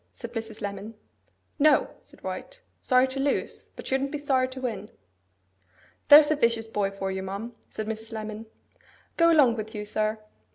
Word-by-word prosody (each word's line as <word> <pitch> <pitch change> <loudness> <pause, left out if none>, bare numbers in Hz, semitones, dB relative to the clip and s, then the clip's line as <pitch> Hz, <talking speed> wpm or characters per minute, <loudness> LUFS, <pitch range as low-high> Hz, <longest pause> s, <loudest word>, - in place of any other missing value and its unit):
said 235 -1 -8
Mrs. 225 -2 -6
Lemon. 205 +2 -5 0.6
'No,' 300 +1 +5
said - - -19
White. - - -7 0.2
'Sorry 255 0 +4
to 265 +1 -5
lose, 280 +1 -2
but - - -9
shouldn't 270 +1 0
be 300 - -2
sorry 265 -3 +1
to 260 0 -8
win.' 220 -5 -4 1.2
'There's 295 +1 +9
a - - +4
vicious 230 -5 +1
boy 210 -3 -1
for 195 -1 -4
you, 190 0 -3
ma'am,' 200 +5 -5 0.2
said 215 - -5
Mrs. 220 +1 -6
Lemon. 215 0 -6 0.7
'Go 335 0 +5
along 265 -8 +5
with 220 +1 -6
you, 210 0 -4
sir. 215 +1 -1
225 Hz, 170 wpm, -27 LUFS, 215-270 Hz, 1.2 s, There's